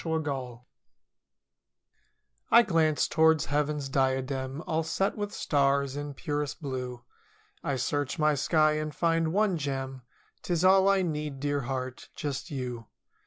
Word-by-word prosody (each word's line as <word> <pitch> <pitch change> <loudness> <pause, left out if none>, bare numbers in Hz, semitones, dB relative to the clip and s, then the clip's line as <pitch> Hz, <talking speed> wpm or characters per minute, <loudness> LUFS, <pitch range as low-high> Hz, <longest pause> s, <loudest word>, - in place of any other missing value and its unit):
JUST 160 -1 -1
YOU 125 -4 -4 1.9
I 240 - +8
glance 160 -7 +2
towards 160 -1 +4
Heaven's 150 -1 0
diadem 130 +1 -1
All 160 -2 0
set 195 +5 -1
with 205 -1 -3
stars 140 -4 +1
in 145 -1 -5
purest 145 -1 -3
blue 125 -4 -5 0.3
— - - -32 0.3
I 140 - -1
search 145 +4 -1
my 155 -1 +3
sky 155 +1 +2
and 155 -1 -4
find 165 -1 +1
one 195 -2 +2
gem— 135 -2 -4 0.4
'Tis 175 0 0
all 190 +1 +6
I 195 -1 +3
need, 150 -4 -3
dear 145 0 -1
heart, 130 -1 -4
just 145 +2 -4
you. 125 -6 -5
145 Hz, 140 wpm, -28 LUFS, 135-160 Hz, 1.9 s, I